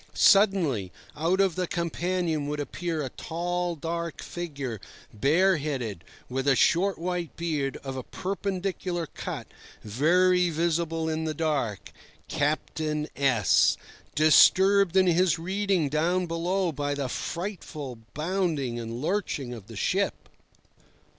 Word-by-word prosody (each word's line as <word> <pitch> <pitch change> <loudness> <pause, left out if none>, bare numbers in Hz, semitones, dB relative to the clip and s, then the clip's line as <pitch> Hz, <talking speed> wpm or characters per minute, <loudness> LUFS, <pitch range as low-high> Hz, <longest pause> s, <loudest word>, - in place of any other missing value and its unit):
Suddenly, 175 - +4 0.2
out 170 +5 +1
of 195 -3 +3
the 180 0 -2
companion 170 -2 -1
would 150 0 -3
appear 160 +2 -3
a 130 - -3
tall, 175 +4 -3
dark 170 +1 -4
figure, 140 - -5 0.3
bareheaded, 140 - +1 0.2
with 135 +2 -3
a 135 - +5
short 185 +9 +3
white 175 -1 -3
beard 150 -5 -1
of 135 -1 -5
a 130 - -3
perpendicular 185 0 -3
cut, - - -6 0.4
very 180 - +3
visible 165 0 0
in 160 0 -1
the 155 -1 -2
dark—Captain 150 - -2
S—, 120 - +3 0.4
disturbed 190 +5 +6
in 190 - +6
his 175 0 +3
reading 190 -1 0
down 170 +5 +1
below 175 +2 0
by 145 -1 -2
the 140 -2 -2
frightful 155 - -5 0.2
bounding 155 -7 -1
and 115 +2 -5
lurching 155 -9 -1
of 110 -4 -10
the 115 - -10
ship. 95 - -1
165 Hz, 120 wpm, -27 LUFS, 140-180 Hz, 0.4 s, disturbed